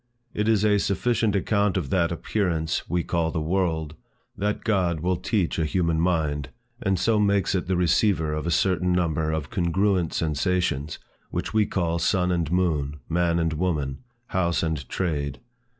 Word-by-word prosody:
It 105 +1 -1
is 110 -2 +3
a 105 -1 +4
sufficient 110 +1 +1
account 100 0 +1
of 75 -7 -3
that 85 -3 +2
Appearance 85 -3 -1
we 90 -1 0
call 85 -2 0
the 80 - -2
World, 80 -2 -1 0.4
that 105 +2 -2
God 90 -7 +1
will 90 +2 +1
teach 95 -4 -1
a - - +2
human 85 0 +1
mind, 80 -5 0 0.3
and 95 -5 +1
so 110 +4 +2
makes 100 -2 +2
it 90 -2 -1
the 95 -1 +1
receiver 85 -2 +2
of 75 +1 -3
a - - +1
certain 90 +1 +2
number 80 -3 0
of 80 -2 -3
congruent 90 0 +1
sensations, 80 -2 -1 0.3
which - - -3
we 110 -1 +3
call 85 -3 -1
sun 90 +1 +1
and 85 -3 -1
moon, 75 -5 0
man 85 0 +1
and 80 -1 0
woman, 75 -5 -1 0.3
house 85 -3 0
and 80 -6 -3
trade. 75 -7 -2
85 Hz, 165 wpm, -25 LUFS, 80-95 Hz, 0.4 s, a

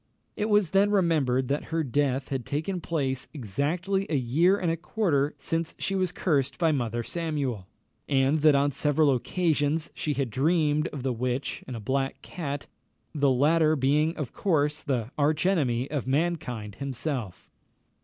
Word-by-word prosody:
It 210 - -1
was 205 -5 +3
then 195 +1 +4
remembered 155 -10 +2
that 145 +2 -1
her 165 0 -1
death 135 0 0
had 135 -3 -2
taken 160 - -3
place 135 -6 -2
exactly 165 - -1
a 160 - 0
year 150 +10 +3
and 175 -4 0
a - - 0
quarter 160 -5 0
since 165 +3 -2
she 195 - -2
was 185 -2 0
cursed 140 -8 0
by 165 -2 +3
Mother 120 -4 -1
Samuel, 140 - -3 0.4
and 135 +2 +3
that 150 -1 +6
on 140 +1 +3
several 145 +1 +2
occasions 150 +4 0
she 150 -2 -2
had 135 -4 -1
dreamed 150 +3 +2
of 140 -4 -7
the 130 -2 0
witch 125 +3 -3
and 130 - -5
a - - -5
black 135 +5 -2
cat, 145 -5 -5 0.5
the 145 -3 +2
latter 155 +4 +3
being 150 +4 +2
of 150 -7 -4
course 150 -5 +1
the 125 -5 -2
arch 150 +3 +2
enemy 135 -10 +1
of 145 -4 -2
mankind 130 - -1
himself. 135 - -4
145 Hz, 165 wpm, -27 LUFS, 130-165 Hz, 0.5 s, that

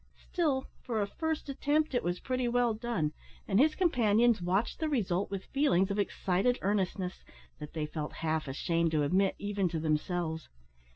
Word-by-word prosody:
Still, 295 -7 -1 0.2
for 230 -4 -2
a 205 - +2
first 320 +10 -3
attempt, 290 +2 0
it 245 - +1
was 175 +1 -1
pretty 255 -1 -1
well 240 -1 +2
done, 215 -9 -2 0.3
and 200 0 +3
his 305 +3 +4
companions 240 - +3
watched 190 +6 0
the 315 -1 0
result 200 -8 0
with 195 -1 -5
feelings 205 -10 +2
of 200 - -1
excited 200 +4 +1
earnestness, 190 -2 -1 0.4
that 150 -1 -8
they 155 -2 -2
felt 150 0 -5
half 155 -1 0
ashamed 165 +5 0
to 150 -1 +3
admit 190 +6 +2
even 205 -2 -1
to 165 -1 -2
themselves. 160 +1 -1
200 Hz, 170 wpm, -31 LUFS, 175-245 Hz, 0.4 s, his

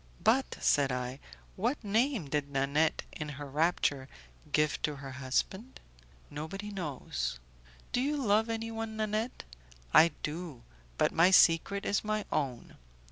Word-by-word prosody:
"But," 265 +4 +2
said 140 -2 +3
I, 125 +1 -3 0.4
"what 240 +7 -1
name 220 - +1
did 145 0 -1
Nanette, 140 +3 +1
in 150 -2 -6
her 145 - -6
rapture, 145 -2 0 0.4
give 150 -1 +1
to 150 - -1
her 135 -1 -8
husband?" 140 - -2 0.5
"Nobody 195 +8 -6
knows." 125 - -4 0.5
"Do 245 - +1
you 295 +3 0
love 220 -3 +2
anyone, 225 -1 -4
Nanette?" 215 +2 -2 0.5
"I 165 - +9 0.2
do; 155 -5 -5 0.3
but - - +3
my 165 +3 +5
secret 190 +2 +4
is 200 - +1
my 215 -1 -1
own." 130 -5 -3
165 Hz, 135 wpm, -31 LUFS, 140-215 Hz, 0.5 s, I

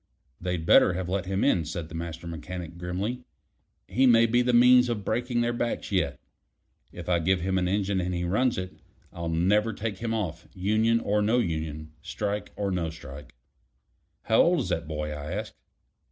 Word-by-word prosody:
They'd 90 -2 -2
better 90 - +6
have 90 0 -3
let 95 0 -2
him 95 +1 0
in," 85 - +3
said 80 +1 -5
the 85 - -13
Master 85 0 -6
Mechanic 85 +1 -6
grimly. 95 +8 -3 0.7
"He 130 +8 +3
may 115 -1 +6
be 120 +2 +3
the 125 0 +2
means 125 +1 +6
of 105 -4 -3
breaking 120 +2 0
their 120 0 0
backs 120 0 -3
yet. - - 0 0.7
If 85 -2 -9
I 90 -1 +2
give 90 +2 +1
him 95 +1 0
an 90 - 0
engine 100 0 0
and 90 +1 -2
he 90 -1 -2
runs 115 +8 +1
it, 95 0 -6 0.3
I'll 85 -1 -4
never 105 +7 +2
take 105 -2 -4
him 115 0 -2
off, 85 -7 -3
union 110 +5 +2
or 105 +1 +1
no 110 +4 +2
union, 80 -6 -2
strike 100 +6 -3
or 100 -1 -2
no 85 -3 -1
strike." 75 -5 -11 0.9
"How 110 - +4
old 175 -3 +3
is - - -4
that 80 -1 -2
boy?" 75 -1 -3
I 75 0 -5
asked. - - -4
95 Hz, 190 wpm, -27 LUFS, 85-110 Hz, 0.9 s, better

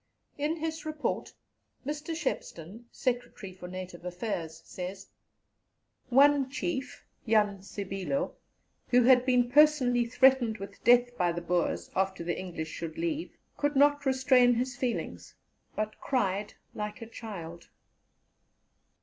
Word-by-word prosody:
" - - -43
In 315 +2 0
his 320 -1 -4
Report, 310 -1 -3 0.5
Mr. 300 +3 -4
Shepstone 220 - -4
(Secretary 245 -6 -3
for 180 -1 -9
Native 180 -1 -8
Affairs) 175 -3 -4
says, 185 +2 -7 1.0
"One 275 +1 +5
chief, 275 -1 -4 0.2
Jan 210 -3 +3
Sibilo, 195 +7 -3 0.5
who 250 0 +5
had 250 +1 +5
been 245 -1 +3
personally 275 -5 +5
threatened 250 -2 +4
with 195 0 -10
death 245 +1 +5
by 175 -1 +3
the 170 0 -4
Boers 175 0 -1
after 190 -2 0
the 175 0 -1
English 170 -4 -5
should 165 0 -6
leave, 330 -1 -3 0.2
could 290 0 0
not 290 +1 +4
restrain 260 -2 +4
his 250 +1 -1
feelings, 245 -1 -4 0.4
but 215 0 -3
cried 205 -5 -1 0.2
like 210 +2 -5
a - - -9
child." 175 -8 -8
240 Hz, 125 wpm, -29 LUFS, 190-270 Hz, 1.0 s, One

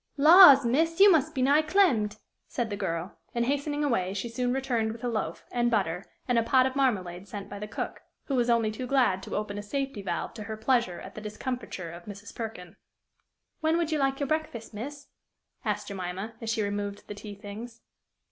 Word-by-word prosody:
"Laws, 300 -3 +9
miss, 325 +8 +1
you 400 0 +9
must 315 -1 +2
be 260 - +1
nigh 285 +4 +5
clemmed!" 295 - +2 0.3
said 235 -4 -3
the - - -1
girl; 180 -2 -4 0.2
and, 235 0 +1
hastening 290 +2 -1
away, 195 -9 0
she 220 +4 -3
soon 245 +2 -1
returned 240 -4 0
with 230 - -12
a - - 0
loaf, 220 -4 -3
and 240 0 +1
butter, 190 -5 0 0.2
and 245 -2 +3
a - - +1
pot 255 +2 +4
of 260 0 -2
marmalade 195 -9 0
sent 200 0 -7
by 205 - -6
the 210 - -5
cook, - - -5 0.2
who 280 - -4
was 245 -2 +2
only 230 -2 +3
too 250 +4 -5
glad 245 -8 +2
to - - -6
open 205 -1 -3
a - - -4
safety 270 +1 -3
valve 175 -3 -3
to 215 -2 -8
her 220 +1 -5
pleasure 235 -5 +1
at - - -10
the 215 - -8
discomfiture 215 -4 -5
of 170 +1 -11
Mrs. 205 +1 -9
Perkin. 215 -7 -7 0.8
"When 315 +1 +2
would 335 -2 0
you 310 - +1
like 270 -1 +1
your 285 - 0
breakfast, 275 -7 -3
miss?" 280 +7 -7 0.6
asked - - -2
Jemima, 195 +2 -5
as 225 - -4
she 225 -1 0
removed 205 0 -4
the - - -5
tea 205 0 -9
things. 220 +4 -9
230 Hz, 210 wpm, -28 LUFS, 205-270 Hz, 0.8 s, Laws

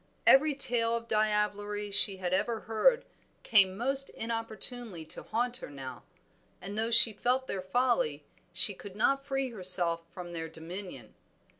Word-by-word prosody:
Every 290 +2 +5
tale 235 -4 +2
of 230 0 -6
diablerie 210 -1 -1
she 195 -1 +3
had 185 -1 -4
ever 225 +4 -1
heard 475 - +1 0.4
came 195 -4 +3
most 270 +4 +4
inopportunely 225 -4 -3
to - - -6
haunt 240 +2 -2
her - - -10
now, 135 -2 -9 0.6
and 195 +3 -7
though 220 +1 -1
she 230 -1 +8
felt 250 +5 -1
their 195 -6 -5
folly 250 - -1 0.3
she - - +1
could 200 -2 -12
not 275 +6 0
free 270 -2 -2
herself 180 -5 +2
from 175 -1 -9
their 165 -1 -6
dominion. 160 - -9
215 Hz, 150 wpm, -29 LUFS, 185-245 Hz, 0.6 s, she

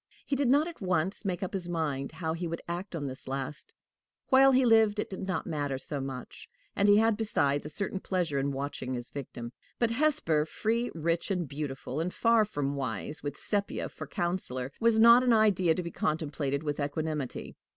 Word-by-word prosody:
He 280 - 0
did 275 -1 +1
not 290 +5 +4
at 340 - -9
once 185 +1 +1
make 185 -1 -1
up 185 - -4
his 180 -3 -3
mind 150 -5 -2
how 160 -1 -2
he 170 +1 -3
would 165 0 -5
act 175 +2 -4
on 150 -3 -3
this 130 -1 -4
last; 135 +2 -4 0.6
while 270 0 +7
he 260 0 +4
lived, 220 -2 +5
it - - -2
did 190 0 -5
not 185 -4 -1
matter 145 -4 -2
so 145 +2 -5
much; 135 -1 -7 0.3
and 200 +1 +3
he 205 - +7
had 225 0 +4
besides 145 -10 0
a - - -7
certain 195 +4 -3
pleasure 175 -7 -1
in 140 +1 0
watching 135 -2 -4
his 120 -1 -7
victim. 120 -3 -7 0.2
But 235 -1 +1
Hesper, 230 - +2
free, 230 +7 -1
rich, 165 +3 -1
and 180 -5 -1
beautiful, 140 -1 -4
and 170 +3 -1
far 230 +1 +3
from 145 -8 -2
wise, 135 +2 -4
with 145 -1 -5
Sepia 205 -1 -2
for - - -8
counselor, 140 -8 -2
was 230 -1 +4
not 235 +2 +8
an 250 -2 +3
idea 190 -7 +4
to 180 - -2
be 170 - -5
contemplated 145 -3 -1
with 145 -1 -2
equanimity. 150 -1 -3
170 Hz, 200 wpm, -29 LUFS, 145-210 Hz, 0.6 s, not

